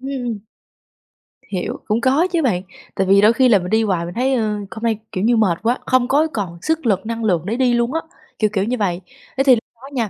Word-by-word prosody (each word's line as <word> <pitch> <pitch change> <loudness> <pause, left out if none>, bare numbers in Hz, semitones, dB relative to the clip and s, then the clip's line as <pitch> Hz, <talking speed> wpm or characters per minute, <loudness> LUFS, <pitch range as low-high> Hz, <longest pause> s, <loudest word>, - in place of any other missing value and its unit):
Ừm. 255 -4 -4 1.1
Hiểu, 185 -3 -3
cũng 215 +3 0
có 275 +8 +3
chứ 340 - +1
bạn, 210 - +1 0.3
tại 190 - 0
vì 195 +1 +5
đôi 215 +2 +5
khi 255 +2 +3
là 210 -4 +5
mình 180 0 -5
đi 220 +2 +2
hoài 185 -5 0
mình 175 - -7
thấy, 260 +4 0
ơ, 250 - +1 0.3
hôm 220 +4 -8
nay, 225 -2 +1
kiểu 185 - -3
như, 235 +2 +3
mệt 185 -6 +2
quá, 240 +3 +1
không 255 -1 +2
có 295 +5 +3
còn 185 -6 -4
sức 320 -2 -1
lực, 200 -3 +1
năng 230 0 -4
lượng 175 -7 +1
để 215 +4 -2
đi 255 -2 +2
luôn 235 +3 0
á, 325 - 0 0.4
kiểu 215 - +2
kiểu 195 -2 +1
như 245 +4 -1
vậy. 185 -5 -1 0.4
Thế 270 - +3
thì 265 -2 +6
lúc 225 - -5 0.2
đó 270 - -10
nha, 230 -5 -1
230 Hz, 255 wpm, -19 LUFS, 200-255 Hz, 1.1 s, thì